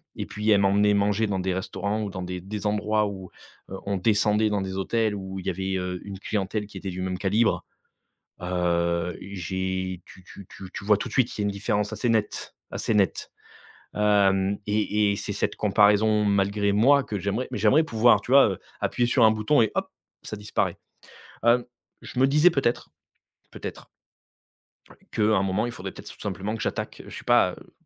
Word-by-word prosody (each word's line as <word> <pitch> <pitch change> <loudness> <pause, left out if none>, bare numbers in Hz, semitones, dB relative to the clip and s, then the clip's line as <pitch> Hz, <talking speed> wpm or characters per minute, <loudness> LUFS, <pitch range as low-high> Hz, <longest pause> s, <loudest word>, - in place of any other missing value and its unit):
et - - -4
puis 105 +1 -3
elle 100 - +5
m'emmenait 100 +1 +3
manger 105 +2 +1
dans 100 -2 -1
des 95 0 -1
restaurants 100 +3 -3
ou 105 - -3
dans 95 -2 -5
des 90 0 -5
des 105 +3 -6
endroits 105 +1 +1
où, 95 -2 -7 0.4
heu, 95 - -5
on 100 -1 -1
descendait 105 +1 +2
dans 100 -2 0
des 95 0 -4
hôtels 110 +2 0
où 95 -1 -6
il 95 - -10
y - - +3
avait, 95 0 -3
heu, 90 -1 -4
une 100 -1 -7
clientèle 105 +1 -2
qui 100 - -11
était 95 +1 -5
du 90 +1 -5
même 90 0 -2
calibre, 110 +3 +1 0.8
heu, 85 -1 0
j'ai 95 -1 -4
tu 95 - -16
tu 95 +1 -12
tu 95 -1 -10
tu 100 - -7
vois 105 -1 +4
tout - - -4
de - - -11
suite 130 -3 +3
qu'il - - -5
y - - 0
a - - +1
une - - 0
différence 105 +1 -1
assez 120 - -1
nette, 110 -2 -1 0.2
assez - - -1
nette, 100 -3 +1 0.6
hem 100 -1 +3
et 105 0 +1
et - - -1
c'est - - -4
cette - - -2
comparaison 105 +1 +4
malgré 100 0 +1
moi 135 +7 +4
que 105 -5 -4
j'aimerais 100 +6 -2
mais - - -3
j'aimerais 120 +10 +4
pouvoir, 120 -3 +4
tu 125 - -7
vois, 140 -5 +7
heu, 95 - -6 0.2
appuyer 120 - +1
sur 125 -3 +5
un 110 - +6
bouton 110 +5 +2
et 110 - +2
hop, - - -1 0.3
ça 110 - -6
disparaît, 105 - -2 0.7
hem. 120 +1 +4 0.4
Je - - -8
me 130 - +6
disais 150 +6 +5
peut-être, 135 -7 -1 0.6
peut-être - - -8 1.3
qu'à 110 - -1
un 105 -2 +3
moment 95 +4 0
il 120 - -5
faudrait 95 -2 -7
peut-être - - -11
tout - - -13
simplement 100 +1 -3
que 110 - -6
j'attaque, - - -4
heu, - - -13
je - - -9
sais - - -11
pas, - - +4
heu - - -15
100 Hz, 205 wpm, -25 LUFS, 95-110 Hz, 1.3 s, vois